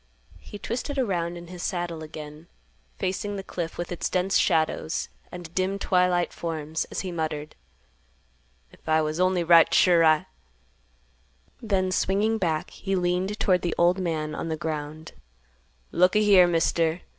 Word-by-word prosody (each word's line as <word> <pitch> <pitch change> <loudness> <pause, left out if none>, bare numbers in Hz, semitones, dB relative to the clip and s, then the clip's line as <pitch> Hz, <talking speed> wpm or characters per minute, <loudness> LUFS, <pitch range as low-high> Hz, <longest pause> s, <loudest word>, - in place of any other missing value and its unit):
He 205 - -10
twisted 250 +7 -4
around 175 -8 -1
in 170 - -9
his 180 0 -9
saddle 175 -3 -3
again, 155 +1 -9 0.5
facing 205 +2 -2
the 195 - -5
cliff 170 -4 -5
with 175 - -5
its 175 - -2
dense 185 +1 0
shadows 160 0 +1 0.2
and 175 -2 -9
dim 190 +2 0
twilight 180 -2 +1
forms, 160 -1 -3
as - - -3
he 185 - -5
muttered, 155 -2 -4 1.2
"If - - -13
I 155 0 +3
was 155 +2 -3
only 185 -1 +2
right 170 0 +6
sure, 175 -2 +5
I—" 155 -1 +4 1.4
Then 190 -5 0
swinging 205 +4 +1
back 165 -2 -1
he 195 -1 -3
leaned 180 +3 -1
toward 185 -3 +2
the 175 - -2 0.2
man 155 -4 -2
on 165 - -4
the 160 - -2
ground; 155 0 -5 0.8
"Look 180 +2 +3
a - - +5
here, 195 -4 +6
Mister. 165 0 +1
175 Hz, 150 wpm, -26 LUFS, 160-185 Hz, 1.4 s, right